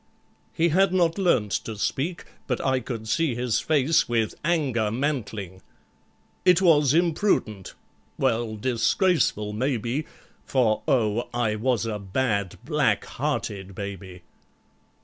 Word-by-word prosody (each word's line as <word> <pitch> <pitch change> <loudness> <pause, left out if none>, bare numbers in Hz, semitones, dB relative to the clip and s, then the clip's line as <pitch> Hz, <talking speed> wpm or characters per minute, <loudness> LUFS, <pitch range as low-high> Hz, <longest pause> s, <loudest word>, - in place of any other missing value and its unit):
He 170 +1 +1
had 190 +3 +3
not 175 -1 +2
learnt 125 - +2
to 110 -2 -6
speak, 155 - -2 0.2
But 125 - -1
I 130 -1 +2
could 115 -2 -6
see 145 +2 +1
his 120 -2 0
face 155 -1 +2
with 115 -3 0
anger 140 -10 +1
mantling. 110 - -3 0.8
It 180 -1 +5
was 150 -6 +4
imprudent—well, 120 - -1
disgraceful 120 - +1
maybe, 125 +4 -1 0.4
For, 120 -5 +1
oh! 120 -3 +1
I 115 -3 +1
was 115 +1 0
a 110 -2 -3
bad, 100 -1 -1
black - - +1
hearted 95 -1 -4
baby! 95 -3 -7
120 Hz, 115 wpm, -25 LUFS, 105-155 Hz, 0.8 s, It